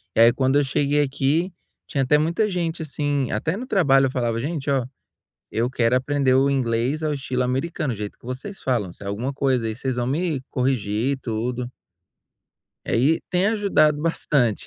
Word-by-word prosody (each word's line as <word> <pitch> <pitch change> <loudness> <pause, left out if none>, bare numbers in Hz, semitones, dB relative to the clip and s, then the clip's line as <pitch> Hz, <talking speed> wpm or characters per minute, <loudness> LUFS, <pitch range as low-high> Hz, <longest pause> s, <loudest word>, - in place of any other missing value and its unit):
E - - +1
aí 115 +1 +8
quando 130 +3 +2
eu - - +2
cheguei 145 +2 +1
aqui, 145 +6 0 0.4
tinha 135 -2 0
até 150 +3 +4
muita 170 +7 +1
gente 170 -4 -2
assim, 145 -3 -1
até 160 - -1
no 245 - -5
trabalho 140 - +4
eu 130 - -1
falava: 120 -3 -1
“Gente, 145 +1 -3
olha, 130 -3 +1 0.6
eu 120 +3 0
quero 125 -1 +2
aprender 135 0 +2
o 135 +2 +4
inglês 130 +3 0
ao 150 -1 0
estilo 130 -2 -2
americano, 135 +2 -1
o - - -6
jeito 105 0 -6
que - - -18
vocês 130 +11 -6
falam. 115 -9 -1
Se 100 - -11
é - - -4
alguma 115 +7 -2
coisa 130 -4 0
aí 110 - -2
vocês 130 +2 -3
vão 120 -1 -1
me 150 0 -1
corrigir 125 -1 0
e - - -1
tudo”. 125 0 -3 1.1
É - - 0
e 150 +6 +3
tem 180 +2 +2
ajudado 170 -9 +2
bastante. 140 -8 +1
135 Hz, 190 wpm, -23 LUFS, 125-150 Hz, 1.1 s, aí